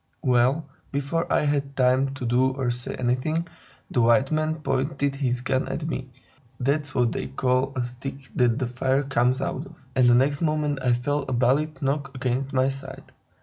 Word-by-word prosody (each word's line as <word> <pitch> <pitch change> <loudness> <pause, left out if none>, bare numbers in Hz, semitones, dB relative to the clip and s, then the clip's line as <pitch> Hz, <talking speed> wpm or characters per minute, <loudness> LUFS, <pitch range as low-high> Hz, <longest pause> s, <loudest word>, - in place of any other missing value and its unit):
Well, 130 +4 +2 0.2
before 145 +4 -1
I - - +3
had 140 -1 0
time 130 +1 +2
to 130 - -5
do 125 +2 +2
or 130 -2 -1
say 120 0 -5
anything, 130 +7 0 0.4
the 120 - +2
white 125 +4 +4
man 155 0 +1
pointed 140 -1 -1
his 125 -3 -1
gun 130 +1 0
at 155 - -3
me 135 -5 -4 0.5
(that's 145 +2 0
what 120 -2 +3
they - - -3
call 130 0 +1
the 130 -2 -3
stick 130 +2 -7
that 120 -2 +3
the 130 - 0
fire 130 +3 0
comes 130 -1 +1
out 135 - -3
of), - - -15 0.2
and 130 -1 +5
the 120 - +6
next 140 +4 +2
moment 150 -3 0
I 125 -1 +3
felt 140 +3 -1
a - - -1
bullet 140 +6 +1
knock 140 0 -1
against 130 +1 -1
my 130 0 +2
side. 135 0 -8
135 Hz, 190 wpm, -25 LUFS, 125-140 Hz, 0.5 s, the